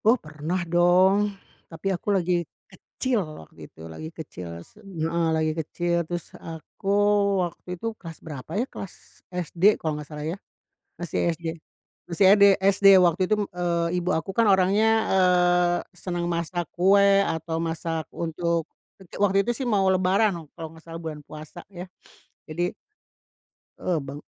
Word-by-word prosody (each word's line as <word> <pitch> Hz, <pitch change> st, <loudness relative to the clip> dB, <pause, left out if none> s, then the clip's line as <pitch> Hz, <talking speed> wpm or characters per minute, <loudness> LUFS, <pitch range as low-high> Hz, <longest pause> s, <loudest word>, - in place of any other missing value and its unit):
Oh, 230 Hz, +4 st, +6 dB
pernah 155 Hz, 0 st, -4 dB
dong, 180 Hz, +4 st, +4 dB, 0.4 s
tapi 190 Hz, +4 st, -3 dB
aku 180 Hz, +3 st, -4 dB
lagi 180 Hz, 0 st, 0 dB, 0.4 s
kecil 255 Hz, -5 st, -2 dB, 0.2 s
waktu -, -, -23 dB
itu, 80 Hz, -, -13 dB
lagi 80 Hz, -, -8 dB
kecil 135 Hz, -, -8 dB, 0.2 s
se 215 Hz, -, -21 dB
heeh, 170 Hz, -4 st, -2 dB
lagi 155 Hz, 0 st, +1 dB
kecil, 175 Hz, +2 st, -1 dB
terus 175 Hz, -2 st, -3 dB, 0.2 s
aku 165 Hz, +4 st, -10 dB, 0.6 s
waktu 175 Hz, -, -10 dB
itu, 200 Hz, -, -9 dB, 0.2 s
kelas 165 Hz, -3 st, -9 dB
berapa 145 Hz, -5 st, -8 dB
ya, 235 Hz, -, +1 dB
kelas 195 Hz, -, -11 dB
SD 180 Hz, -2 st, -6 dB, 0.2 s
kalau 155 Hz, -1 st, -2 dB
enggak 150 Hz, -1 st, -7 dB
salah 150 Hz, -1 st, -6 dB
ya, -, -, -7 dB, 0.6 s
masih 175 Hz, 0 st, -1 dB
SD, 170 Hz, 0 st, -4 dB, 0.6 s
masih 170 Hz, +3 st, +2 dB
ED 205 Hz, -1 st, +5 dB
SD. 195 Hz, +1 st, +3 dB, 0.2 s
Waktu 170 Hz, +1 st, +1 dB
itu, 215 Hz, -, +4 dB
mmm, -, -, -17 dB
eee, 170 Hz, -1 st, 0 dB
ibu 175 Hz, -, -2 dB
aku 190 Hz, +4 st, -5 dB
kan 225 Hz, +1 st, +3 dB
orangnya, 195 Hz, +3 st, +4 dB, 0.3 s
eee, 180 Hz, -1 st, +4 dB, 0.2 s
senang 175 Hz, 0 st, -4 dB
masak 170 Hz, 0 st, -2 dB
kue 200 Hz, +2 st, +5 dB
atau 160 Hz, 0 st, -3 dB
masak 165 Hz, -1 st, -3 dB
untuk 170 Hz, 0 st, -2 dB, 0.3 s
kerja 190 Hz, -3 st, -15 dB
waktu 195 Hz, -1 st, +3 dB
itu 240 Hz, -, +1 dB
sih 260 Hz, +1 st, -4 dB
mau 195 Hz, -2 st, +3 dB
lebaran 190 Hz, +3 st, +2 dB
noh, 170 Hz, -2 st, -7 dB
kalau 160 Hz, -1 st, -7 dB
enggak 165 Hz, +1 st, -16 dB
salah 165 Hz, -, -6 dB
bulan 155 Hz, -2 st, -6 dB
puasa 155 Hz, +3 st, -10 dB
ya, 180 Hz, -2 st, -8 dB, 0.6 s
jadi 175 Hz, +3 st, -2 dB, 1.1 s
Eee, 175 Hz, -3 st, 0 dB
bang 140 Hz, +1 st, -7 dB
175 Hz, 160 wpm, -25 LUFS, 160-190 Hz, 1.1 s, Oh